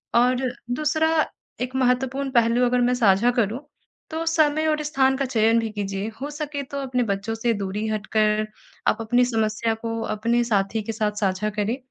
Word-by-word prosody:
और 250 Hz, +1 st, +3 dB, 0.2 s
दूसरा 305 Hz, +4 st, +1 dB, 0.5 s
एक 255 Hz, +1 st, -3 dB
महत्वपूर्ण 265 Hz, +1 st, +1 dB
पहलू 235 Hz, 0 st, +3 dB
अगर 245 Hz, 0 st, +2 dB
मैं 245 Hz, +1 st, +3 dB
साझा 225 Hz, 0 st, +4 dB
करूँ 235 Hz, -1 st, 0 dB, 0.5 s
तो 320 Hz, +1 st, -3 dB
समय 315 Hz, -1 st, +2 dB
और 305 Hz, -1 st, +1 dB
स्थान 270 Hz, -3 st, +2 dB
का 275 Hz, -, 0 dB
चयन 230 Hz, -2 st, +3 dB
भी 225 Hz, -1 st, -2 dB
कीजिए, 200 Hz, -1 st, -3 dB
हो 285 Hz, -, -3 dB
सके 295 Hz, -1 st, -4 dB
तो 280 Hz, +1 st, -7 dB
अपने 255 Hz, -2 st, 0 dB
बच्चों 205 Hz, 0 st, -2 dB
से 230 Hz, +1 st, 0 dB
दूरी 200 Hz, +1 st, -3 dB
हटकर 215 Hz, 0 st, +1 dB, 0.4 s
आप -, -, +3 dB
अपनी 245 Hz, +2 st, +3 dB
समस्या 225 Hz, -1 st, 0 dB
को 225 Hz, 0 st, -4 dB
अपने 235 Hz, +3 st, +1 dB
साथी 215 Hz, -1 st, 0 dB
के 225 Hz, -, -3 dB
साथ 215 Hz, -1 st, -1 dB
साझा 195 Hz, +1 st, 0 dB
करें 210 Hz, +4 st, -1 dB
235 Hz, 175 wpm, -24 LUFS, 215-265 Hz, 0.5 s, साझा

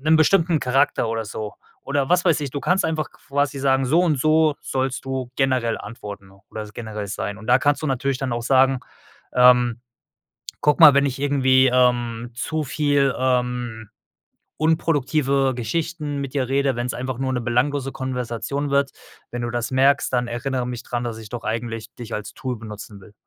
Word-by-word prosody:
'nen 155 Hz, +3 st, +4 dB
bestimmten 165 Hz, 0 st, +3 dB
Charakter 125 Hz, -2 st, +1 dB
oder 115 Hz, 0 st, -2 dB
so 105 Hz, 0 st, -6 dB, 0.3 s
oder 140 Hz, 0 st, -1 dB
was 180 Hz, 0 st, +4 dB
weiß 165 Hz, -3 st, +4 dB
ich, 145 Hz, -2 st, -3 dB
du 140 Hz, +1 st, -4 dB
kannst 190 Hz, +2 st, +1 dB
einfach 160 Hz, -1 st, -1 dB
quasi 145 Hz, 0 st, -2 dB
sagen: 135 Hz, -1 st, +2 dB
„So 160 Hz, +7 st, +4 dB
und 155 Hz, -6 st, +1 dB
so 155 Hz, 0 st, +3 dB
sollst 130 Hz, 0 st, -2 dB
du 130 Hz, -2 st, -3 dB
generell 130 Hz, -4 st, +1 dB
antworten 105 Hz, -3 st, -9 dB, 0.2 s
oder 110 Hz, -, -5 dB
generell 110 Hz, -2 st, -6 dB
sein“ 100 Hz, +1 st, -4 dB
und 110 Hz, -, -11 dB
da 125 Hz, +1 st, +5 dB
kannst 145 Hz, +3 st, +1 dB
du 155 Hz, -, -1 dB
natürlich 135 Hz, 0 st, 0 dB
dann 135 Hz, -3 st, -2 dB
auch 120 Hz, 0 st, -2 dB
sagen, 130 Hz, +1 st, +3 dB, 0.5 s
ähm: 125 Hz, -1 st, +5 dB, 0.8 s
„Guck 150 Hz, -1 st, +3 dB
mal, 150 Hz, -4 st, +10 dB
wenn 140 Hz, 0 st, +4 dB
ich 135 Hz, 0 st, -3 dB
irgendwie, 130 Hz, -2 st, +4 dB
ähm, 120 Hz, -2 st, +1 dB
zu 155 Hz, +5 st, -2 dB
viel, 145 Hz, -1 st, +1 dB
ähm, 125 Hz, -3 st, -1 dB, 0.7 s
unproduktive 145 Hz, -4 st, +1 dB
Geschichten 150 Hz, +5 st, -3 dB
mit 135 Hz, -, -6 dB
dir 130 Hz, -3 st, 0 dB
rede, 135 Hz, -1 st, +1 dB
wenn's 120 Hz, +1 st, -2 dB
einfach 130 Hz, 0 st, -4 dB
nur 130 Hz, 0 st, -1 dB
'ne 125 Hz, -2 st, -1 dB
belanglose 135 Hz, +3 st, 0 dB
Konversation 130 Hz, +2 st, -3 dB
wird, 140 Hz, 0 st, +2 dB, 0.4 s
wenn 120 Hz, 0 st, -4 dB
du 120 Hz, -, -2 dB
das 120 Hz, 0 st, -2 dB
merkst, 135 Hz, +2 st, +3 dB
dann 125 Hz, -1 st, +1 dB
erinnere 125 Hz, +1 st, -2 dB
mich 120 Hz, -1 st, -5 dB
dran, 120 Hz, 0 st, -3 dB
dass 115 Hz, -2 st, -4 dB
ich 110 Hz, -1 st, -10 dB
doch 120 Hz, 0 st, -7 dB
eigentlich 115 Hz, 0 st, -4 dB
dich 120 Hz, -2 st, -7 dB
als 105 Hz, -, -5 dB
Tool 130 Hz, -2 st, -4 dB
benutzen 105 Hz, -2 st, -9 dB
will.“ 100 Hz, +2 st, -16 dB
130 Hz, 185 wpm, -22 LUFS, 120-140 Hz, 0.8 s, mal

